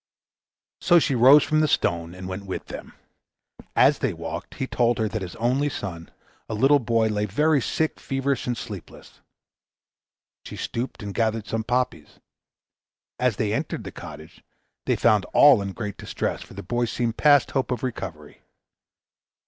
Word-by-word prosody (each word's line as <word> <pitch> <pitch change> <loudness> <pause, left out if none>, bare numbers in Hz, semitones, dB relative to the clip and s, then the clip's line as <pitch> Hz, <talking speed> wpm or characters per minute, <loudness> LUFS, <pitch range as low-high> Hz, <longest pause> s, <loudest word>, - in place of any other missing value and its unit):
So 175 - +5
she 155 -4 +2
rose 130 +5 +7
from 155 - +1
the 155 - +3
stone 85 - 0
and 95 0 -8
went 95 +1 -6
with 95 - -5
them. - - -9 0.8
As - - +5
they - - 0
walked - - -7
he 130 - -2
told 120 -2 +1
her 110 - 0
that 110 0 -4
his 90 -2 -6
only 130 +5 +1
son, 85 -10 -6 0.4
a 110 - -2
little 135 +6 +4
boy, 115 -2 +1
lay 105 0 0
very 150 +7 +2
sick, 160 +6 -1
feverish, 135 0 -2
and 120 -1 -1
sleepless. 105 -5 -10 1.2
She - - -9
stooped 120 -1 -4
and 100 -1 -5
gathered 110 -1 0
some 110 +1 -2
poppies. 125 -10 -2 1.0
As 125 -4 +2
they 105 +1 -1
entered - - -3
the - - -7
cottage, 75 +2 -11 0.4
they - - +3
found 105 -2 +3
all 140 -7 +7
in 100 0 -4
great 105 -1 -6
distress, - - -3
for - - -12
the - - -7
boy 120 +6 0
seemed 115 0 -2
past 145 -3 +5
hope 135 -2 -1
of 125 0 -3
recovery. 85 - -6
115 Hz, 165 wpm, -24 LUFS, 100-130 Hz, 1.2 s, rose